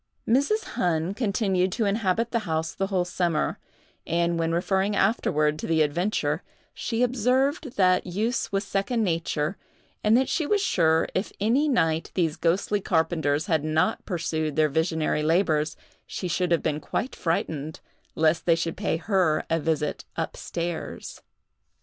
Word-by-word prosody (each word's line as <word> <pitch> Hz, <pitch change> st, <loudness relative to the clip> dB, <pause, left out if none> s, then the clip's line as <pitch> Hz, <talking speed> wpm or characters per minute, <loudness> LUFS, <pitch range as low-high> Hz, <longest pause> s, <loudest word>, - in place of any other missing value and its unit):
Mrs. 285 Hz, -, +2 dB
Hunn 170 Hz, +1 st, -1 dB
continued 195 Hz, -4 st, 0 dB
to 225 Hz, -, 0 dB
inhabit 210 Hz, +2 st, 0 dB
the 235 Hz, -, +1 dB
house 160 Hz, 0 st, -1 dB
the 195 Hz, -, -2 dB
whole 185 Hz, -3 st, 0 dB
summer; 175 Hz, -3 st, -1 dB, 0.5 s
and, 170 Hz, 0 st, +1 dB
when 165 Hz, 0 st, 0 dB
referring 190 Hz, +4 st, +1 dB
afterward 155 Hz, -9 st, +1 dB
to -, -, -4 dB
the 160 Hz, -1 st, +3 dB
adventure, 175 Hz, +8 st, 0 dB, 0.3 s
she 235 Hz, +1 st, -1 dB
observed 255 Hz, +4 st, +1 dB
that 185 Hz, -2 st, +3 dB
use 215 Hz, +7 st, -1 dB
was 195 Hz, 0 st, 0 dB
second 200 Hz, +4 st, -1 dB
nature, 165 Hz, -1 st, -1 dB, 0.5 s
and 215 Hz, +2 st, +5 dB
that 260 Hz, -, +2 dB
she 310 Hz, -, 0 dB
was 415 Hz, -, +2 dB
sure 165 Hz, -, +2 dB
if 185 Hz, -, -1 dB
any 240 Hz, +9 st, +2 dB
night 165 Hz, -, +1 dB
these 165 Hz, -4 st, +1 dB
ghostly 195 Hz, +4 st, 0 dB
carpenters 160 Hz, -4 st, +1 dB
had 160 Hz, -5 st, +1 dB
not 155 Hz, +7 st, +1 dB
pursued 160 Hz, -4 st, -2 dB
their 155 Hz, -1 st, +3 dB
visionary 160 Hz, 0 st, 0 dB
labors, 155 Hz, -1 st, +1 dB, 0.3 s
she 185 Hz, -, -4 dB
should 180 Hz, +1 st, 0 dB
have 170 Hz, -, +2 dB
been 150 Hz, -1 st, 0 dB
quite 245 Hz, +10 st, -3 dB
frightened, 160 Hz, -2 st, -2 dB, 0.4 s
lest 160 Hz, +2 st, +2 dB
they 165 Hz, -, +6 dB
should 165 Hz, 0 st, -2 dB
pay -, -, -1 dB
her 175 Hz, -3 st, +1 dB
a 165 Hz, -, +2 dB
visit 150 Hz, -1 st, -1 dB
up -, -, -2 dB
stairs. 170 Hz, -1 st, -5 dB
175 Hz, 155 wpm, -26 LUFS, 160-205 Hz, 0.5 s, they